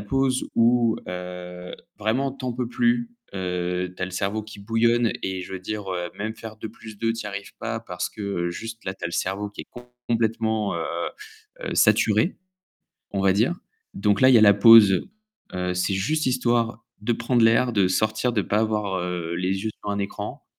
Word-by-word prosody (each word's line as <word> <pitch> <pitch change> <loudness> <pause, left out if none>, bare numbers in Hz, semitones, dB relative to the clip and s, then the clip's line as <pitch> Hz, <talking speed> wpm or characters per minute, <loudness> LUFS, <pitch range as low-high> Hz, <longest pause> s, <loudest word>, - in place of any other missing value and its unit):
pause 130 +5 0
où, 115 -1 +4
heu, 90 0 -7 0.2
vraiment 125 +6 0
tu 135 -1 -10
en 125 - -1
peux 125 0 -2
plus, 240 - +1 0.2
heu, 90 -1 -2
tu - - -5
as - - +3
le 95 - -7
cerveau 100 +3 -1
qui 110 -1 -11
bouillonne 115 +1 +2
et 95 -1 -3
je 95 - -9
veux 95 - -4
dire, 105 0 -5
heu, 90 -1 -3
même 110 +2 -3
faire 110 -1 -9
2 110 - -6
plus 110 -1 -12
2 115 0 +1
tu 115 - -5
y - - -6
arrives 100 0 -7
pas 115 0 -2
parce 90 -5 -4
que 100 -5 -3
juste 115 +5 -7
là, 95 - -3
tu - - -9
as - - +2
le 85 - -7
cerveau 100 +2 -2
qui 105 - -9
est - - -21 0.4
complètement, 110 -3 0
heu 85 - -2 0.8
heu, - - -4
saturé. - - +3 0.8
On 100 - -1
va 95 -1 +5
dire, 115 - +2 0.4
donc 105 -2 +1
là, 130 - +7
il 130 - +7
y - - +9
a - - +5
la 100 -2 +8
pause. 105 - +7 0.5
Heu, 90 0 -1
c'est 90 +2 0
juste 140 +11 0
histoire 120 -2 +1 0.2
de 115 +3 0
prendre 120 +1 +1
l'air, 115 +2 +4
de 100 -4 +3
sortir, 110 +5 +1
de 105 - +2
pas 105 - 0
avoir, 105 -3 0
heu, 85 -1 -3
les 95 +3 -1
yeux 110 - 0
sur 105 - -3
un 100 - -1
écran 100 - -5
105 Hz, 205 wpm, -24 LUFS, 95-115 Hz, 0.8 s, y